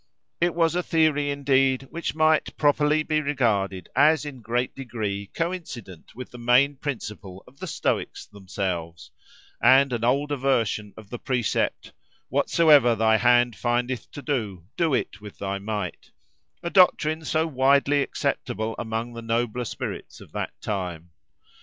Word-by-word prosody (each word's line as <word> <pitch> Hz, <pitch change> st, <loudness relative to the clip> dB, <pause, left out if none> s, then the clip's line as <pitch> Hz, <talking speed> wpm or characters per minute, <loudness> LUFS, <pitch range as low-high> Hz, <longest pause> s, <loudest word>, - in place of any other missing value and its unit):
It 175 Hz, 0 st, +1 dB
was 165 Hz, -1 st, +2 dB
a 180 Hz, -, +1 dB
theory, 155 Hz, -4 st, +1 dB
indeed, 135 Hz, -2 st, +2 dB
which 170 Hz, -1 st, -4 dB
might 155 Hz, 0 st, +2 dB
properly 150 Hz, +1 st, +3 dB
be 155 Hz, 0 st, 0 dB
regarded 105 Hz, -, 0 dB
as 150 Hz, +3 st, +4 dB
in 135 Hz, -4 st, -8 dB
great 120 Hz, +3 st, -1 dB
degree 105 Hz, -6 st, -4 dB
coincident 160 Hz, -, -6 dB
with 125 Hz, +1 st, -8 dB
the 125 Hz, -, -10 dB
main 125 Hz, +4 st, +3 dB
principle 105 Hz, -9 st, -6 dB
of 130 Hz, +2 st, -20 dB
the 185 Hz, -, -6 dB
Stoics 155 Hz, -, -2 dB
themselves, 95 Hz, -4 st, -5 dB, 0.5 s
and 135 Hz, 0 st, +5 dB
an 115 Hz, -1 st, -2 dB
older 140 Hz, +4 st, +1 dB
version 115 Hz, -6 st, 0 dB
of 110 Hz, -2 st, -13 dB
the 120 Hz, -, -5 dB
precept 125 Hz, -4 st, -1 dB, 0.4 s
"Whatsoever 145 Hz, -8 st, +4 dB
thy 110 Hz, 0 st, +3 dB
hand 120 Hz, -1 st, +3 dB
findeth 120 Hz, +5 st, -2 dB
to 145 Hz, -, -8 dB
do, 110 Hz, -, -3 dB
do 165 Hz, -6 st, +2 dB
it 100 Hz, -, -3 dB
with 105 Hz, -1 st, -11 dB
thy 100 Hz, 0 st, -3 dB
might"—a 105 Hz, -, -7 dB
doctrine 160 Hz, -4 st, +4 dB
so 160 Hz, +1 st, 0 dB
widely 140 Hz, 0 st, +3 dB
acceptable 110 Hz, -4 st, -2 dB
among 115 Hz, +1 st, -4 dB
the 115 Hz, -, -7 dB
nobler 115 Hz, +1 st, -1 dB
spirits -, -, -6 dB
of -, -, -15 dB
that -, -, -5 dB
time. 90 Hz, -4 st, -4 dB
125 Hz, 145 wpm, -25 LUFS, 105-145 Hz, 0.5 s, and